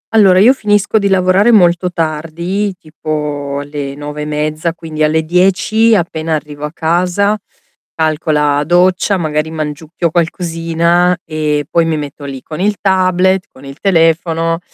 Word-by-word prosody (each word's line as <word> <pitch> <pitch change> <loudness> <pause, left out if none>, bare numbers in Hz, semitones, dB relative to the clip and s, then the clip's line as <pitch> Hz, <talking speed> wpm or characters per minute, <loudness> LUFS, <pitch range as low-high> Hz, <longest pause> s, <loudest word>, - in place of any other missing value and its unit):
Allora 195 -4 +6
io 235 +7 +6
finisco 210 -2 +1
di 200 - 0
lavorare 190 +4 +3
molto 180 -3 +3
tardi, 170 +5 -2
tipo 150 -2 -4
alle 145 -1 -6
9:30, 150 +2 -3
quindi 155 -2 -7
alle 155 +1 +2
10, 195 +6 +2
appena 160 -3 -1
arrivo 150 -1 -6
a 150 - -5
casa, 180 +5 +1 0.6
calcola 150 -2 +1
doccia, 180 +4 +2
magari 155 -2 -1
mangiucchio 155 +1 -4
qualcosina 170 +1 +1
e 150 -2 -1
poi 170 -1 +1
mi 160 -1 -1
metto 145 -1 -7
lì 135 -2 -7
con 155 +1 -8
il 205 +2 +1
tablet, 185 -1 +2
con 135 +1 -15
il 135 0 -10
telefono, 165 -2 +1
165 Hz, 135 wpm, -14 LUFS, 150-185 Hz, 0.6 s, Allora